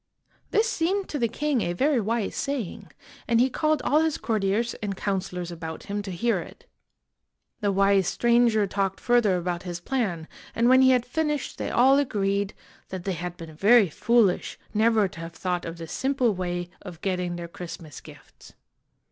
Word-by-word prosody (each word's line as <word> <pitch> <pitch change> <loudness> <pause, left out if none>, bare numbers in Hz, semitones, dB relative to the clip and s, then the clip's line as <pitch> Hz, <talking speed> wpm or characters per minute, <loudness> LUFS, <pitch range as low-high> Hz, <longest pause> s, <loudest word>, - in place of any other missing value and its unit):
This 435 +2 +2
seemed 385 -1 0
to 295 - -3
the 235 - +2
king 280 +2 -1
a 175 - -1
very 275 +8 +2
wise 220 0 -1
saying, 275 -10 -4 0.4
and 230 -1 +3
he 255 +2 +3
called 310 +2 +1
all 300 +2 +3
his 320 -2 0
courtiers 220 +1 0
and 200 -3 -3
counselors 180 -3 -3
about 160 -1 -7
him 205 +1 -3
to 200 - -7
hear 210 +6 0
it. - - -11 0.9
The 205 -1 +1
wise 195 -1 +3
stranger 235 -3 +3
talked 195 -1 -2
further 235 -6 +3
about 175 0 -2
his 175 -2 -5
plan, 175 -7 -2 0.3
and 230 +1 +3
when 260 +1 +6
he 260 - +6
had 250 -2 +3
finished 300 +1 -2
they - - -2
all 265 +3 +5
agreed 200 -6 -1 0.3
that 185 -2 -6
they 195 - -1
had 175 +1 -5
been 165 -2 -9
very 205 +3 +5
foolish 215 0 +2 0.2
never 220 -1 +3
to 170 - -12
have 165 0 -7
thought 180 +1 -2
of 165 0 -6
this 165 -1 -8
simple 260 -4 +1
way 175 -1 -3
of 175 -4 -10
getting 180 -2 -1
their 170 0 -6
Christmas 170 -4 -9
gifts. - - -16
200 Hz, 180 wpm, -26 LUFS, 180-245 Hz, 0.9 s, when